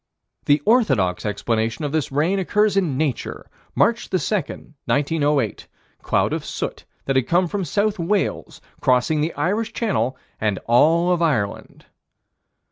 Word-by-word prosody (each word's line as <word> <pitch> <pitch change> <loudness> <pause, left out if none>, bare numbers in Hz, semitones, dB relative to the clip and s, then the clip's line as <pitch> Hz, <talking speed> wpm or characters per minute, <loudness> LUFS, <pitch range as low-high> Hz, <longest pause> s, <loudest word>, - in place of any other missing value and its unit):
The 145 0 +3
orthodox 130 - +2
explanation 110 +6 -1
of 145 - -2
this 155 -2 -1
rain 160 +8 +1
occurs 210 +2 +1
in 170 -9 +1
Nature, 145 -4 -2 0.3
March 235 0 +2
2, 185 - +1
1908 150 - -1 0.3
cloud - - +1
of - - -3
soot - - -5 0.2
that 135 - 0
had 130 -2 +2
come 175 +1 +2
from 195 +3 -3
South 205 +5 0
Wales, 190 +4 -1 0.2
crossing 130 +4 +2
the 160 +3 0
Irish 215 +5 -1
Channel 130 - -1 0.2
and 105 -3 0
all 165 +9 +4
of 175 -1 +1
Ireland. 115 -12 -2
155 Hz, 135 wpm, -22 LUFS, 130-190 Hz, 0.3 s, all